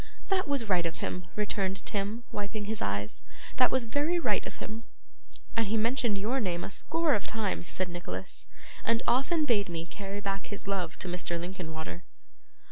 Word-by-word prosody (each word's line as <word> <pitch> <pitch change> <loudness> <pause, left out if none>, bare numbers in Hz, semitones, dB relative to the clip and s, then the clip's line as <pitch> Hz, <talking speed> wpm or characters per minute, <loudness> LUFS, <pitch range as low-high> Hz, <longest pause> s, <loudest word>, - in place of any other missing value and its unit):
'That 380 -3 +3
was 275 -6 +2
right 180 -4 +4
of 165 - -3
him,' 180 -1 -2
returned 195 -2 0
Tim, 210 +3 -1
wiping 205 +1 -2
his 215 +1 -2
eyes; 100 -1 -1 0.4
'that 250 - +7
was 260 -1 +2
very 290 +9 +2
right - - +2
of - - -7
him.' 225 +2 -6 0.7
'And 225 -2 +3
he 220 +3 +2
mentioned 230 -1 +2
your 225 +7 +1
name 175 -6 0
a - - -4
score 325 - +3
of 205 - +1
times,' 210 -5 0
said 185 - 0
Nicholas, 95 - -4 0.4
'and 230 +1 +2
often 300 +5 +4
bade 205 -8 +3
me 165 -1 -2
carry 200 +2 -5
back 195 -1 -2
his 205 -1 -3
love 185 -4 -1
to - - -3
Mr. 175 -1 -1
Linkinwater. 160 - -4
200 Hz, 180 wpm, -31 LUFS, 175-230 Hz, 0.7 s, that